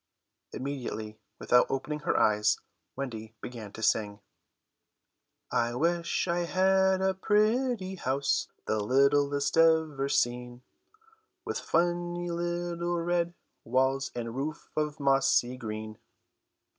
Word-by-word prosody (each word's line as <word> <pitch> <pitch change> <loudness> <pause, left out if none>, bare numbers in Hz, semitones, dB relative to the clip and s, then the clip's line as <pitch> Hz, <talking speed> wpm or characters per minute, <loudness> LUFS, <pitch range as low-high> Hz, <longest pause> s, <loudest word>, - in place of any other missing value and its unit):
Immediately, 125 -5 -5 0.2
without 125 0 +4
opening 150 +3 -2
her 150 - 0
eyes, 105 0 +3 0.4
Wendy 115 -5 -6
began 115 -4 -8
to 110 - -7
sing: 105 -2 +1 1.3
"I 120 0 +1
wish 170 +5 0
I 170 0 +1
had 190 +1 +3
a 190 0 +2
pretty 210 0 +1
house, 135 -2 0 0.2
The 110 - 0
littlest 140 +6 +2
ever 160 -4 +3
seen, 125 -1 -1 0.8
With - - -2
funny 175 +1 0
little 175 0 -2
red 170 0 0 0.3
walls 130 +3 +1
And 115 -1 -4
roof 150 +3 -5
of 150 0 -1
mossy 135 -3 +3
green." 110 -3 -6
140 Hz, 105 wpm, -29 LUFS, 125-175 Hz, 1.3 s, without